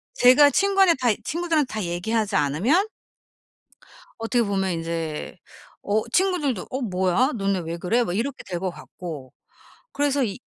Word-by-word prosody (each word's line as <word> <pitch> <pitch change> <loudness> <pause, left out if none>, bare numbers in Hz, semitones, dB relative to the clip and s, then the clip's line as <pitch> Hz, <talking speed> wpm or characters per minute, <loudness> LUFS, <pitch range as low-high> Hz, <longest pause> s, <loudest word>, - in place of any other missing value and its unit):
제가 285 - +6
친구한테 390 -1 +4
다 245 - +1 0.2
친구들한테 325 -4 0
다 215 -2 -2
얘기하지 205 +5 -1
않으면 205 - +2 1.3
어떻게 230 +2 +1
보면 195 -4 -1
이제 165 0 -4 0.5
어 210 +2 +1
친구들도 320 - +1
"어 260 - -3
뭐야? 190 - +1
너네 195 -2 0
왜 165 0 -5
그래?" 215 +8 +1
막 175 - -3
이렇게 265 +5 -3
될 175 -2 -3
것 190 -1 -1
같고. 155 -7 -9 0.6
그래서 285 -1 +1
이 200 -2 -3
220 Hz, 295 characters per minute, -24 LUFS, 180-280 Hz, 1.3 s, 제가